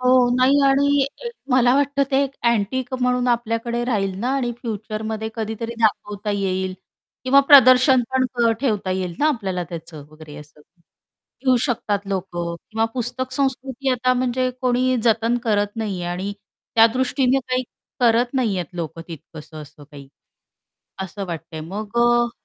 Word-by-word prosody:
हो. 255 -1 +4
नाही. 265 +3 +4
आणि 280 0 +3 0.4
मला 250 -1 +4
वाटतं 280 0 +2
ते 270 0 +3 0.3
अँटिक 235 +4 -1
म्हणून 250 0 +1
आपल्याकडे 235 0 -1
राहील 195 -6 -1
ना 245 - -1
आणि 245 -3 -1
फ्युचरमध्ये 220 0 -4
कधीतरी 225 +1 -4
दाखवता 210 -1 0
येईल 190 -1 -2 0.5
किंवा 275 +2 +6
प्रदर्शन 255 -2 +7
पण 250 -3 +1
ठेवता 210 -8 -1
येईल 185 -2 -2
ना 300 - +2
आपल्याला 190 -10 -2
त्याचं 165 -3 -9
वगैरे 155 -1 -12
असं. 150 0 -14 0.8
घेऊ 255 -1 +4
शकतात 215 -5 -1
लोक 190 -1 -2
किंवा 175 +6 -3
पुस्तक 255 +1 -2
संस्कृती 265 -1 -1
आता 255 0 +2
म्हणजे 255 0 0
कोणी 255 0 +1
जतन 230 +1 +2
करत 205 -1 0
नाहीये 200 -6 -3
आणि 185 +3 -3 0.4
त्या 225 0 +7
दृष्टीने 260 0 +1
काही 255 0 0 0.4
करत 240 +2 +3
नाहीहेत 205 -9 0
लोक, 165 -1 -5
तितकसं 155 -1 -10
असं 150 0 -15
काही 140 -2 -13 0.9
असं 195 +1 -6
वाटतंय. 160 -1 -7
मग 205 +8 -5
अ 240 0 +3
230 Hz, 140 wpm, -21 LUFS, 190-255 Hz, 0.9 s, प्रदर्शन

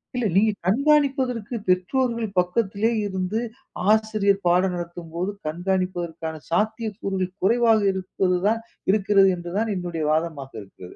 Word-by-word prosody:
இல்ல 245 -2 0
நீங்க 215 +2 +4
கண்காணிப்பதற்கு 260 -1 +2
பெற்றோர்கள் 230 +6 +1
பக்கத்திலே 200 +4 +1 0.2
இருந்து, 190 +2 -2 0.5
ஆசிரியர் 215 -2 +2
பாடம் 180 +1 +3
நடத்தும்போது 175 +2 -5
கண்காணிப்பதற்கான 175 -2 -2
சாத்தியக்கூறுகள் 210 -2 -1
குறைவாக 225 +2 +4
இருப்பது 185 -1 -1
தான் 225 +1 +2 0.3
இருக்கிறது 200 -1 +4
என்று 175 0 -7
தான் 220 0 0
என்னுடைய 175 -3 -3
வாதமாக 155 -4 -2
இருக்கிறது. 95 -2 -13
195 Hz, 110 wpm, -24 LUFS, 175-220 Hz, 0.5 s, நீங்க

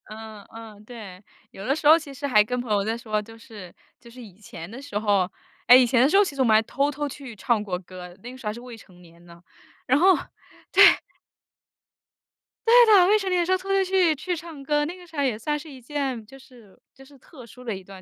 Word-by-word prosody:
嗯 215 -1 -10
嗯， 220 -2 -12
对， 210 -5 -11 0.3
有 195 - -10
的 275 - +1
时 305 -1 -1
候 315 +2 +8
其 300 -4 -10
实 285 +2 -7
还 210 -6 +4
跟 250 +4 -4
朋 245 -3 -6
友 205 -1 +1
在 225 +3 -2
说， 215 -2 -3
就 225 +2 -14
是 210 -6 -13 0.3
就 235 - -16
是 250 +2 -13
以 205 -6 -14
前 170 -5 -10
的 240 +5 -10
时 280 -7 -6
候 200 -4 +1 0.4
诶， 250 +2 +9
以 255 - +4
前 240 0 +2
的 265 - +4
时 390 - +3
候， 405 - +6
其 325 -8 -5
实 270 - -2
我 - - +3
们 225 - +3
还 215 - +5
偷 275 +5 -1
偷 295 +1 -4
去 270 -4 -10
唱 215 +1 -1
过 185 -4 -4
歌， 180 -1 -12
那 245 - -8
个 255 - -12
时 260 - -14
候 - - -1
还 - - -4
是 235 - -10
未 245 -1 -11
成 185 -5 -18
年 170 0 -19
呢， 170 0 -16 0.4
然 260 +3 +2
后 375 +2 +5 0.7
对。 - - +7 1.7
对 460 - +5
的， 400 -5 +6
未 420 +2 +4
成 395 -2 -5
年 365 - +1
的 345 - +1
时 365 - -2
候 375 - +3
偷 375 +1 -11
偷 390 0 +2
去 370 -3 +2
去 355 +5 -4
唱 330 -3 -10
歌， 295 +1 0
那 340 +4 -6
个 360 -1 -15
时 325 - -17
候 285 - +1
也 250 -6 -1
算 295 +7 -2
是 310 +2 -11
一 265 -3 -12
件， 265 -2 -4
就 270 - -14
是 245 -7 -19
就 270 - -17
是 280 +1 -19
特 260 0 -15
殊 250 +3 -15
的 225 -4 -4
一 190 - -10
段 195 +1 -13
245 Hz, 285 characters per minute, -24 LUFS, 210-295 Hz, 1.7 s, 诶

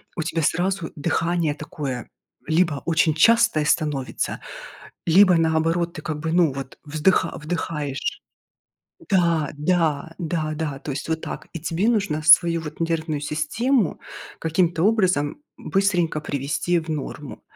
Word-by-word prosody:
у 160 - -2
тебя 165 +1 -2
сразу 180 +2 0
дыхание 165 +1 0
такое: 145 -5 -6 0.4
либо 160 -3 +1
очень 160 -2 +2
частое 230 -2 +4
становится, 150 -4 -1 0.7
либо, 185 +2 +6
наоборот, 165 +1 +1
ты 155 - -7
как 150 -1 -4
бы, 160 +1 -3
ну, 170 -5 +3
вот 135 -1 -7
вздыха 160 +3 +1
вдыхаешь. 155 - -3 0.9
Да 170 -6 +2
да 160 -1 0
да 160 -2 -2
да. 150 -3 -3
То 145 - -5
есть 135 - -5
вот 160 0 -2
так. - - -7
И 170 - -5
тебе 165 +6 -1
нужно 200 -10 0
свою 165 +1 +6
вот 155 -1 -8
нервную 160 -3 -1
систему 195 - 0 0.4
каким-то 165 +1 +1
образом 190 - +1
быстренько 195 - 0
привести 145 +5 -1
в 165 0 -6
норму. 150 -2 -5
160 Hz, 135 wpm, -23 LUFS, 150-175 Hz, 0.9 s, либо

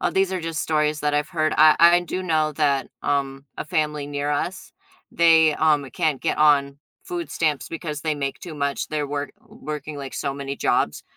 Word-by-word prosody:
Uh, - - +1
these 190 0 +1
are 185 - -2
just 165 -2 -3
stories 150 -1 0
that 150 0 0
I've 150 0 0
heard. 155 -3 0
I 155 0 +7
I 170 +1 +6
do 180 +1 -4
know 155 -3 +1
that, 140 -3 0
um, 140 -1 -2
a - - -4
family 150 -2 -1
near 145 0 -3
us, 175 +6 -3 0.4
they, 160 -2 +5
um, 150 -3 +2
can't 145 +3 -1
get - - -1
on 140 -2 +3 0.2
food 355 -3 -5
stamps 150 -4 -1
because 155 -3 -5
they 155 0 -1
make 140 -2 -4
too 170 -3 -8
much. 140 -1 -2
They're 150 -1 -2
work 145 0 -4
working 150 0 -7
like 140 -2 -7
so 140 - -3
many 140 0 -5
jobs, - - 0
150 Hz, 200 wpm, -23 LUFS, 145-160 Hz, 0.4 s, I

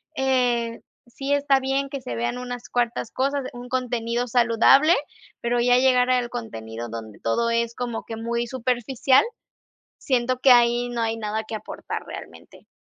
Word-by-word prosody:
eh, 245 -4 +1 0.3
sí 275 +4 -3
está 280 -1 +3
bien 270 +1 0
que 275 -1 -5
se 120 - -5
vean 120 - -2
unas 245 -1 -7
cuartas 240 -1 -1
cosas, 275 0 -1
un 245 0 -9
contenido 245 -1 -1
saludable, 245 +6 +5 0.5
pero 240 0 0
ya 245 0 +4
llegar 250 -1 +4
al 250 -1 +2
contenido 115 - -6
donde 110 -2 -8
todo 235 - 0
es 235 0 0
como 240 -2 -4
que 225 - -7
muy 235 +1 -2
superficial, 255 +1 +2 0.7
siento 255 -2 0
que 260 0 +6
ahí 240 0 +4
no 240 -1 -3
hay 225 0 0
nada 220 0 -3
que 220 - -5
aportar 215 - -6
realmente. - - -11
240 Hz, 160 wpm, -24 LUFS, 230-255 Hz, 0.7 s, que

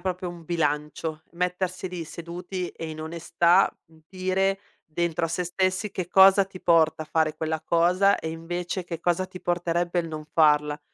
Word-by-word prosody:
proprio 185 0 -3
un 175 -1 -9
bilancio: 155 -1 -2
mettersi 180 +1 -2
lì 175 -2 -5
seduti 175 +3 -6
e, 165 - -7
in 155 0 -7
onestà, 170 +3 +2 0.2
mhmm, 160 0 -22
dire 190 +1 0 0.2
dentro 170 +1 -1
a - - -8
se 170 +2 -2
stessi 185 +3 -1
che 185 -3 -4
cosa 195 +1 +7
ti 190 -1 -12
porta 160 -2 +3
a 155 - -11
fare 155 -1 +1
quella 160 0 -2
cosa, 180 +4 +3
e, 160 - -4
invece, 175 +2 -4
che 165 -2 -6
cosa 175 +2 +1
ti 185 0 -11
porterebbe 175 0 0
il 165 - -6
non 155 -1 -6
farla. 150 -1 +3
170 Hz, 175 wpm, -25 LUFS, 160-185 Hz, 0.2 s, cosa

